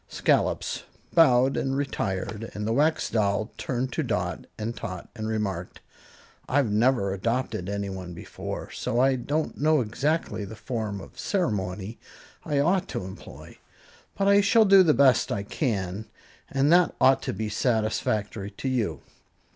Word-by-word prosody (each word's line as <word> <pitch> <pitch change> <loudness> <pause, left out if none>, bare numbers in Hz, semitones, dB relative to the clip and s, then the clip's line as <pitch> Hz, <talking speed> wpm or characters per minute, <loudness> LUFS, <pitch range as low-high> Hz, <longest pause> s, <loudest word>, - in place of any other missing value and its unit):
Scollops - - 0 0.3
bowed 130 -5 +5
and 135 0 -1
retired, 110 -5 -3
and 105 0 -3
the 110 - 0
Wax 155 +5 +2
Doll 105 0 0
turned 130 0 -3
to - - 0
Dot - - -2
and 115 +2 -4
Tot 90 -6 -6
and 110 -2 -4
remarked, 100 -5 -3 0.7
"I've 135 -5 +2
never 105 -3 +2
adopted 110 -2 -2
anyone 95 -3 -4
before - - -7
so 120 - -2
I 135 +1 +4
don't 145 +5 -2
know 155 0 +4
exactly 135 +2 -1
the 110 +2 -8
form 110 -4 -4
of - - -13
ceremony 105 - -2 0.4
I 145 - -1
ought 180 +6 +2
to - - -4
employ; 95 0 -11 0.6
but 195 - +1
I 200 0 +6
shall 220 +2 +5
do 195 -1 +8
the 160 -5 +4
best 130 -3 +4
I 100 - -1
can, 100 - -2 0.4
and 135 +4 +3
that 180 0 +4
ought 135 0 +5
to - - -3
be 110 +3 -3
satisfactory 110 -2 -1
to 105 +6 -6
you." 125 -4 -1
115 Hz, 150 wpm, -26 LUFS, 100-140 Hz, 0.7 s, do